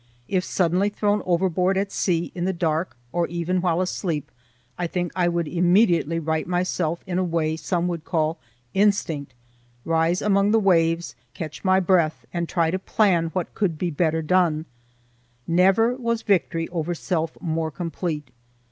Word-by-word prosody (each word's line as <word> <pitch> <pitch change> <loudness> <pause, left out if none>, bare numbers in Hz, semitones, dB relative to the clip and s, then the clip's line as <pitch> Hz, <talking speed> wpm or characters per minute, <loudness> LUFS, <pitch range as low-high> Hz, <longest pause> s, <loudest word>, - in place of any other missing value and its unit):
If 185 -2 0
suddenly 185 +3 +1
thrown 205 0 0
overboard 185 +1 +2
at 195 0 -1
sea 170 -2 0
in 175 -1 -3
the 190 - 0
dark, 165 -3 -1
or 170 +1 0
even 175 +1 -1
while 175 -1 +1
asleep, 165 -5 -2 0.4
I 175 - -2
think 175 0 -2
I 180 -2 +2
would 170 -2 0
immediately 175 -1 +3
right 160 0 -1
myself 175 -2 -1
in 185 -1 -1
a - - +1
way 165 -3 0
some 175 +1 -1
would 170 -3 -3
call 160 -1 -1 0.3
"instinct," 165 -10 +1 0.5
rise 165 +2 +2
among 200 -1 +3
the 225 +1 +4
waves, 170 -4 +2 0.2
catch 155 -2 -7
my 190 -1 +4
breath, 175 -4 +2
and 170 -1 -2
try 165 -2 +1
to 185 - -1
plan 185 -5 +2
what 185 -3 -2
would 175 -6 +1 0.2
better 160 0 +1
be - - -10
done. 170 -4 +2 0.8
Never 190 +7 +4
was 235 -3 -2
victory 170 -4 +1
over 175 0 -2
self 165 -1 -2
more 160 -2 -1
complete. 160 -3 -4
175 Hz, 160 wpm, -24 LUFS, 165-185 Hz, 0.8 s, the